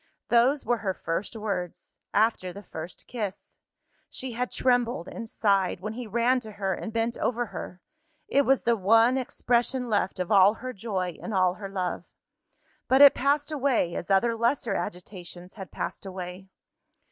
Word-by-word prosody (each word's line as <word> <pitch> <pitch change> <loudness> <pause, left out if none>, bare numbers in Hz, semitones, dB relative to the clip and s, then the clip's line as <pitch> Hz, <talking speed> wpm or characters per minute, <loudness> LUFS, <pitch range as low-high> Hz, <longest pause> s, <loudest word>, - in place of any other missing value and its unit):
Those 250 +4 +3
were 240 -1 +1
her 190 -3 -2
first 170 +7 -3
words 195 -5 -4 0.2
after 210 -4 +1
the 200 +3 -10
first 160 -1 -8
kiss. 210 -6 -6 0.5
She 260 -1 -5
had 245 +2 -2
trembled 245 -7 +1
and 230 -2 -7
sighed, 195 -5 +1
when 210 +4 -5
he 240 0 -6
ran 240 +4 +2
to 220 -3 -10
her 195 -1 -1
and 225 - -5
bent 230 +1 -1
over 240 0 0
her: 180 0 -7 0.5
it 280 - +3
was 270 -1 +2
the 235 - +3
one 225 +5 +4
expression 250 -1 0
left 205 -3 0
of 180 +2 -2
all 200 +1 +6
her 255 +2 -6
joy 190 -5 -3
and 220 - -4
all 185 -1 +3
her 195 +1 -8
love. 185 -2 -3 0.8
But 265 +2 +6
it 285 - +10
passed 290 +3 +1
away 270 - +1
as 175 - -5
other 230 +4 +3
lesser 235 -1 0
agitations 180 -1 -6
had 190 -4 -9
passed 175 - -5
away. 185 0 -7
220 Hz, 170 wpm, -27 LUFS, 185-245 Hz, 0.8 s, it